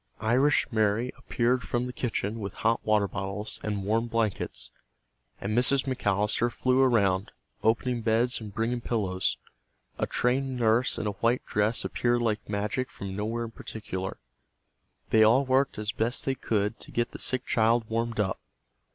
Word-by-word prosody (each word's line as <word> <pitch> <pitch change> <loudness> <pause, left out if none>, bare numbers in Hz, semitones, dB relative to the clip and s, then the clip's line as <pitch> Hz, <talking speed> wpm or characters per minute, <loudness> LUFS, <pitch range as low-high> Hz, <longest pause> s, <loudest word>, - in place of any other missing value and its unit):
Irish 130 +6 +3
Mary 110 +2 +1
appeared 125 +2 0
from 120 0 -1
the 125 - -5
kitchen 115 -3 -2
with 100 -3 -5
hot 115 +1 +3
water 105 -2 +3
bottles 100 +2 -4
and 105 -2 -2
warm 110 +4 +1
blankets, 110 - -1 0.7
and 105 +2 -2
Mrs. 125 +3 +4
McAllister 105 -2 +1
flew 130 +2 +2
around, 100 -7 +3 0.3
opening 120 +2 +1
beds 115 +2 +2
and 105 -2 -7
bringing 115 +4 -1
pillows. 95 -6 -1 0.6
A - - 0
trained 130 +1 0
nurse 115 +1 +3
in 110 - -3
a 105 - 0
white 115 +5 0
dress 105 +3 0
appeared 120 0 +1
like 110 -3 -1
magic 105 +5 -1
from 95 -1 -7
nowhere 115 +3 -2
in 115 - -8
particular. 95 -4 -5 0.9
They 110 - +5
all 120 +6 +5
worked 130 +1 +2
as 105 0 -2
best 115 +4 -1
they 135 - +1
could 105 -3 -1
to - - -8
get 120 0 -1
the - - -8
sick 130 -1 -1
child 115 0 +2
warmed 115 0 -2
up. 95 -3 0
115 Hz, 160 wpm, -28 LUFS, 105-120 Hz, 0.9 s, They